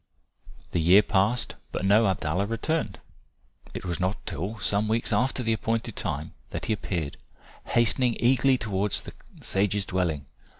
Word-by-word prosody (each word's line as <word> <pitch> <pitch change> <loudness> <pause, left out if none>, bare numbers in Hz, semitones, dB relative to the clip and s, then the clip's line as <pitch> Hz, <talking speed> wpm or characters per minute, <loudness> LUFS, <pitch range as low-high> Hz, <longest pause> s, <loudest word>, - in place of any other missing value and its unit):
The 85 - +1
year 90 +6 +7
passed. 105 +5 +1 0.2
But - - -2
no 105 +3 +5
Abdallah 95 +1 0
returned. 115 -1 -1 0.8
It - - -5
was 85 -1 -2
not 95 +3 -2
till 95 +8 -4
some 100 +1 +1
weeks 115 +2 0
after 130 0 +1
the 115 -1 +2
appointed 115 +1 -2
time 75 +1 -3 0.2
that - - -4
he 110 - +1
appeared 85 -7 -3 0.5
hastening 120 +1 +2
eagerly 130 +2 +4
towards 105 -3 -1
the - - -9 0.3
sage's 100 0 0
dwelling. 85 -7 -1
105 Hz, 145 wpm, -27 LUFS, 95-115 Hz, 0.8 s, year